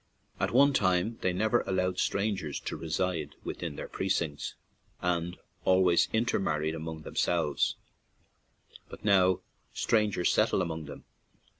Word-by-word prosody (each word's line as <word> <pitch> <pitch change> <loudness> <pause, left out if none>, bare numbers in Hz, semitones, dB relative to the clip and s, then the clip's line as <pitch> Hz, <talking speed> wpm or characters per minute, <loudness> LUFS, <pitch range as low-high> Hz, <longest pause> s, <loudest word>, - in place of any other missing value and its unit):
At - - +1
one 140 +3 +5
time 95 +1 +1
they 95 - +2
never 110 +6 +2
allowed 90 -1 0
strangers 100 -8 -1
to - - -4
reside 80 -2 -2
within 85 -4 -5
their - - -6
precincts, 85 -6 -2 0.4
and 90 0 -1 0.3
al 95 0 +4
ways 85 -2 +4
intermarried 80 -9 0
among 80 -1 -6
themselves, 80 -4 0 1.1
but - - -11
now 95 -2 +4 0.3
strangers 105 -5 +2
settle - - +3
among 80 -2 -4
them. - - -10
90 Hz, 125 wpm, -30 LUFS, 80-100 Hz, 1.1 s, one